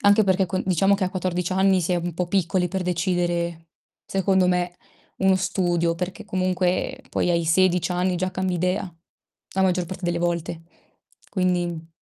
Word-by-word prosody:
anche 205 +1 +5
perché 190 0 +2
con 185 +2 -2
diciamo 195 +2 +3
che 195 - 0
a 185 - -2
14 180 -1 -2
anni 190 0 +3
si 180 +1 0
è - - +2
un 175 0 -3
po' 175 +2 -2
piccoli 180 -1 +1
per 190 +1 -3
decidere, 175 -2 -1 0.4
secondo 190 -1 +2
me, 180 0 0 0.4
uno 190 0 +4
studio, 175 -2 0
perché 185 +5 -5
comunque, 185 -2 0
poi, 180 - 0
ai 170 -1 +1
16 180 +1 +3
anni 180 0 0
già 185 +1 -1
cambi 185 -1 -1
idea, 180 0 -1 0.6
la 190 - +2
maggior 180 -1 +1
parte 185 +1 -7
delle 175 0 0
volte. 170 -1 -2 0.7
Quindi 175 -3 -1
180 Hz, 170 wpm, -24 LUFS, 175-190 Hz, 0.7 s, anche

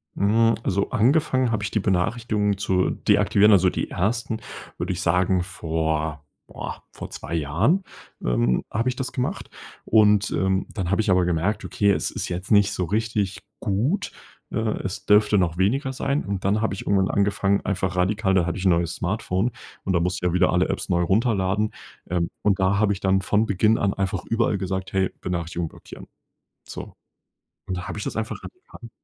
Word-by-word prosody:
Hm, 115 +3 +3
also, 100 +1 0
angefangen 130 +1 +2
habe 105 -2 -1
ich 100 - -3
die 110 - +1
Benachrichtigungen 105 +2 0
zu 95 -1 +1
deaktivieren, 105 +2 +3
also 95 -2 +5
die - - -3
1., 110 +4 -1 0.4
würde 95 - -2
ich 90 - -4
sagen, 90 +1 +2
vor 80 -4 -2 0.3
boah, - - -7
vor - - -8
2 - - -7
Jahren, 85 - +1 0.4
ähm, - - +1
habe 115 +4 -1
ich 125 - 0
das 130 -1 -4
gemacht. 125 - -3 0.3
Und, 105 -2 +4
ähm, 95 0 +1
dann 95 -5 -3
habe 100 +3 +2
ich 105 - +1
aber 90 -1 +4
gemerkt: 90 +5 0
„Okay, 100 -1 +2
es - - 0
ist - - -4
jetzt 90 +1 -5
nicht 100 -1 +5
so 95 -3 -1
richtig 105 0 -1 0.2
gut. 115 - -1 0.4
Äh, - - -4 0.2
es 95 0 -5
dürfte 105 0 +4
noch 85 -3 +1
weniger 130 +9 +1
sein.“ 140 +2 -1
Und 100 -1 -4
dann 105 +2 +2
habe 110 - 0
ich 95 - -7
irgendwann 95 -1 +2
angefangen, 100 0 +1
einfach 95 -2 -1
radikal 95 +2 +1
da 90 -3 +3
hatte 85 - -2
ich 95 - -4
'n - - +5
neues 85 0 +1
Smartphone. 95 +3 -1 0.3
Und 95 - -1
da 85 - +3
musste 90 +1 -1
ich - - +3
ja - - -3
wieder 90 0 +3
alle 90 +1 +2
Apps - - -2
neu 85 -2 +2
runterladen. 100 +1 +1 0.4
Ähm, 85 -1 0
und 100 -1 +2
da 95 +1 +2
habe 105 -1 +3
ich 95 - -8
dann 95 0 +2
von 105 +4 +2
Beginn 110 +2 +2
an 100 -1 +1
einfach 95 -1 -2
überall 115 -2 +1
gesagt: 95 0 -4
„Hey, 95 -1 +1
Benachrichtigung 85 -1 -3
blockieren.“ - - -12 0.6
So. - - -8 0.7
Und 95 - -3
da 90 - -6
habe - - -5
ich - - -4
das - - -4
einfach 110 -1 -3
radikal 365 +1 -12
95 Hz, 190 wpm, -24 LUFS, 90-110 Hz, 0.7 s, also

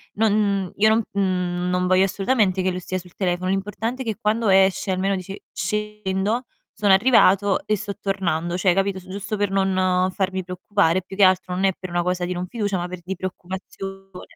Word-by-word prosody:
non 200 -3 +1
io 215 +2 +4
non 220 +1 +3
mhmm, 180 -2 -1
non 180 0 +1
voglio 185 +1 +4
assolutamente 195 0 +1
che 185 - +1
lui 180 - -4
stia 185 +1 -3
sul 180 -1 -15
telefono, 185 -1 -1
l'importante 210 +6 -2
è - - -4
che 220 -3 -2
quando 220 0 +1
esce 190 0 +3
almeno 190 +1 0
dice: 195 +1 -7
"Scendo, 210 +2 -2 0.3
sono 205 -2 +2
arrivato 200 -3 +4
e 215 -1 +1
sto 205 0 -5
tornando," 175 -3 -1
cioè 185 0 +3
capito 195 0 0
su 185 - -17
giusto 200 +2 -4
per 205 -1 0
non 185 -1 +1
farmi 190 -1 -2
preoccupare, 180 -1 0
più 190 - -10
che 200 - +3
altro 185 -1 +3
non 185 - -1
è 195 - +4
per 185 - -7
una 175 0 0
cosa 180 0 -1
di 180 - -2
non 180 0 -4
fiducia, 205 -2 -2
ma 175 - -3
per 180 0 -7
di 190 +2 -4
preoccupazione. 190 +1 -8
190 Hz, 200 wpm, -22 LUFS, 185-205 Hz, 0.3 s, io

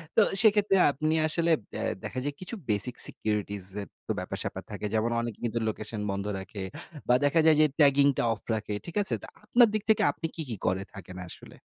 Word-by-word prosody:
তো - - +6 0.2
সেক্ষেত্রে 210 -3 +4 0.2
আপনি 155 +3 -1
আসলে 170 +2 +1 0.2
ব্যা 110 - -4 0.2
দেখা 130 - -4
যায় 145 +1 -2
কিছু 185 +6 -5
basic 105 +4 +1
securities 105 -2 -3 0.2
এর 100 - -7 0.2
তো - - 0
ব্যাপার - - -5
স্যাপার - - -5
থাকে। - - -5
যেমন 110 +1 +1
অনেকে 115 -2 -5
কিন্তু 115 0 -1
লোকেশন 110 0 -4
বন্ধ 100 0 -3
রাখে 95 +1 -7 0.4
বা, 125 - +5
দেখা 145 +3 +3
যায় 160 -1 +7
যে - - +7
tagging 140 -1 +6
টা - - +1
অফ 105 - -9
রাখে। 105 -1 -4
ঠিক 170 - -9
আছে? 195 - +1
তো - - -9 0.2
আপনার 235 +2 +6
দিক 215 -1 -1
থেকে 220 - +4
আপনি 165 - -7
কি, 165 - -4
কি 115 - -3
করে 95 +1 +1
থাকেন 90 -3 -10
আসলে? - - -12
120 Hz, 210 wpm, -28 LUFS, 105-160 Hz, 0.4 s, যায়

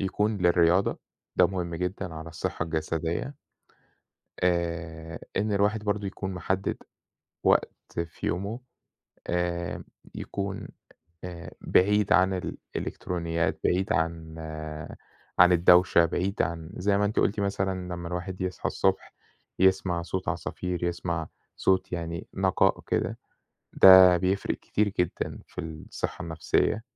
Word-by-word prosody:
يكون 105 +2 0
للرياضة 90 +1 +3 0.4
ده - - +6
مهم 90 -3 -3
جدًا 90 0 -3
على 80 +1 -7
الصحة 80 0 -3
الجسدية. 80 - -2 1.1
آآ، 85 -2 -1 0.2
إن 105 +1 0
الواحد 105 +2 +1
برضه 105 -1 -1
يكون 95 0 -5
محدد 95 +2 -1 0.7
وقت - - +1
في 85 - -6
يومه 100 +6 -2 0.7
آآ، 85 -1 -2 0.3
يكون 100 -1 -4 0.6
آآ، 85 -2 -7
بعيد 105 +2 +3
عن 95 0 +5 0.4
الإلكترونيات، 85 -2 -2
بعيد 95 +2 +2
عن 80 0 -2 1.0
عن 90 +1 +8
الدوشة 90 0 +6
بعيد 90 +4 0
عن 85 -1 -4
زي 100 +2 +2
ما 105 - +2
أنتِ 105 +1 0
قُلتِ 105 +1 +2
مثلًا 95 -2 -2
لمّا 85 -1 -6
الواحد 90 +2 -5
يصحى 95 -1 -3
الصبح - - 0 0.4
يسمع 95 -2 +3
صوت 90 +2 -4
عصافير، 90 +1 -3
يسمع 85 -2 -2 0.3
صوت 95 -1 +1
يعني 85 -1 -4
نقاء - - +2
كده - - -1 0.5
ده 95 -1 +9
بيفرق 95 +3 0
كتير 105 0 0
جدًا 90 - -2
في - - -7
الصحة 80 -2 -5
النفسية، 85 +6 0
90 Hz, 120 wpm, -27 LUFS, 85-95 Hz, 1.1 s, ده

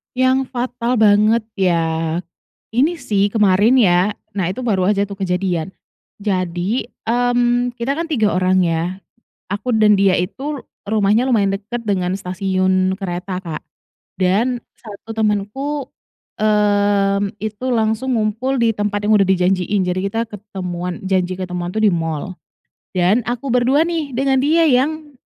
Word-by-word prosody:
Yang 260 +1 +2
fatal 245 0 -2
banget 215 0 +4 0.2
ya 180 -3 +2 0.9
ini 295 +9 +2
sih 205 -6 +1
kemarin 210 +3 +3
ya, 190 -1 +3 0.2
nah 190 -4 -1
itu 190 - -6
baru 195 -5 +1
aja 200 -1 +2
tuh 200 - -7
kejadian. 180 -2 -1 0.5
Jadi, 190 +3 -1 0.2
mmm, 245 +1 +1
kita 235 +4 -1
kan 330 +2 -3
3 220 -8 +2
orang 185 0 +3
ya 170 +2 -1 0.5
aku 215 +5 -1
dan 215 -1 +5
dia 195 -1 +4
itu 270 +10 -3 0.3
rumahnya 215 +3 +2
lumayan 205 -5 +2
dekat 230 +4 -6
dengan 185 -3 0
stasiun 185 0 0
kereta, 185 -1 -4
Kak, 165 -3 -5 0.6
dan 220 +7 +1 0.2
1 215 0 -12
temanku, 220 +7 -1 0.5
mmm, 205 -1 +2
itu 215 +3 -4
langsung 225 +3 0
ngumpul 225 +5 0
di 230 - +4
tempat 205 0 -2
yang 210 0 +4
udah 195 - +4
dijanjiin, 190 +1 +1
jadi 180 +1 -1
kita 225 +3 -2
ketemuan 180 -4 -6
janji 185 -1 0
ketemuan 180 -1 -4
tuh 220 - 0
di 210 - +5
mall. 165 +1 -3 0.6
Dan 185 +6 +2
aku 245 +3 -3
ber-2 265 +6 +3
nih 320 -5 -2
dengan 265 +2 +1
dia 325 +2 +4
yang, 290 +3 0
205 Hz, 140 wpm, -19 LUFS, 185-240 Hz, 0.9 s, dan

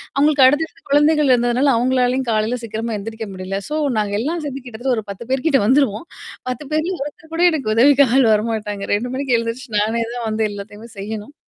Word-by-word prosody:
அவங்களுக்கு 285 -1 +4
அடுத்தடுத்த 290 +1 0
குழந்தைகள் 295 0 +3
இருந்ததுனால 245 +3 +2
அவுங்களாலயும் 255 +1 +1
காலையில 220 +3 0
சீக்கிரமா 225 0 -4
எந்திரிக்க 220 +2 -6
முடியல. 190 +1 -4
சோ 305 - -2 0.2
நாங்க 205 -1 -1
எல்லாம் 325 +7 -2
சேந்து 270 -2 -6
கிட்டத்தட்ட 245 +2 -2
ஒரு 220 - -3
10 225 +5 -10
பேர் 265 +2 -1
கிட்ட 275 -4 +3
வந்துருவோம். 255 +1 +2 0.4
10 255 +4 -5
பேர்ல 335 +4 -1
ஒருத்தர் 320 +2 -11
கூட 340 - +1
எனக்கு 270 -9 -1
உதவி 275 +5 +6
ஆள் 255 -1 +4
வரமாட்டாங்க. 210 -2 -2
2 245 +4 -3
மணிக்கு 265 -3 +1
எழுந்திரிச்சு 230 +3 -4
நானே 225 +3 0
தான் 235 -2 -3
வந்து 220 0 -1
எல்லாத்தையுமே 205 +3 -9
செய்யணும். 210 +5 -6
245 Hz, 185 wpm, -19 LUFS, 220-280 Hz, 0.4 s, உதவி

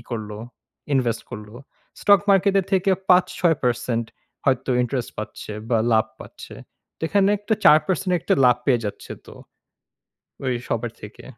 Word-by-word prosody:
করল, 110 -2 -5 0.6
ইনভেস্ট 120 -4 0
করল। 105 -3 -8 0.5
স্টক 200 -1 +5
মার্কেটের 195 0 +3
থেকে 190 +1 +2 0.2
৫-৬% 125 -10 +2 0.4
হয়তো 130 -1 +1
ইন্টারেস্ট 125 -1 -3
পাচ্ছে 105 0 -7 0.2
বা 115 - +3
লাভ 110 0 +3
পাচ্ছে। - - -11 0.4
তো - - -66
এখানে 200 -1 +3
একটা 215 +2 -1
৪% 180 +4 +4
একটা - - +1
লাভ 125 -1 +5
পেয়ে 120 -4 +2
যাচ্ছে 100 - -6
তো। - - -12 1.1
ওই 130 -1 0
সবার 115 0 -2
থেকে। 105 0 -11
130 Hz, 130 wpm, -22 LUFS, 115-185 Hz, 1.1 s, স্টক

